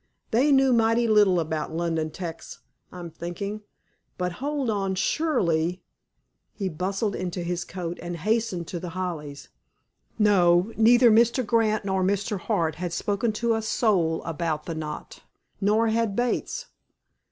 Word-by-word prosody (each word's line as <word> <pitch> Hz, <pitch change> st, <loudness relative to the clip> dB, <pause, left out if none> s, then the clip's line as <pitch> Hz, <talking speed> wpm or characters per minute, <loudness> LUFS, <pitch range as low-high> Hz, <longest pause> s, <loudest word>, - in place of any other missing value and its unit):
They 260 Hz, +6 st, +3 dB
knew 270 Hz, -2 st, +5 dB
mighty 230 Hz, 0 st, +3 dB
little 205 Hz, -5 st, +4 dB
about 160 Hz, -1 st, -3 dB
London 165 Hz, -2 st, -1 dB
'tecs, 165 Hz, 0 st, -7 dB, 0.3 s
I'm 175 Hz, -2 st, -8 dB
thinking. 200 Hz, +6 st, -5 dB, 0.6 s
But, 180 Hz, 0 st, -1 dB
hold 285 Hz, -2 st, -1 dB
on. 195 Hz, -3 st, -1 dB
Surely—" 180 Hz, -, 0 dB, 0.7 s
He 195 Hz, -3 st, -3 dB
bustled 195 Hz, +5 st, -2 dB
into 180 Hz, -1 st, -4 dB
his 175 Hz, 0 st, -2 dB
coat, 175 Hz, -1 st, -6 dB
and 175 Hz, 0 st, -5 dB
hastened 215 Hz, -2 st, -1 dB
to 175 Hz, -, -4 dB
The 180 Hz, 0 st, -7 dB
Hollies. 150 Hz, -6 st, -5 dB, 0.7 s
No, 190 Hz, -1 st, +4 dB
neither 240 Hz, +2 st, +6 dB
Mr. 235 Hz, +3 st, +3 dB
Grant 215 Hz, -1 st, +1 dB
nor 190 Hz, -1 st, 0 dB
Mr. 200 Hz, +2 st, 0 dB
Hart 165 Hz, -2 st, -1 dB
had 175 Hz, 0 st, -4 dB
spoken 205 Hz, +5 st, 0 dB
to 235 Hz, +2 st, 0 dB
a 225 Hz, -, 0 dB
soul 190 Hz, -7 st, +1 dB
about 160 Hz, -1 st, -3 dB
the 165 Hz, -, -4 dB
knot. 155 Hz, -1 st, -7 dB, 0.4 s
Nor 215 Hz, +3 st, +3 dB
had 225 Hz, -2 st, 0 dB
Bates. 245 Hz, -, -1 dB
190 Hz, 140 wpm, -25 LUFS, 170-225 Hz, 0.7 s, neither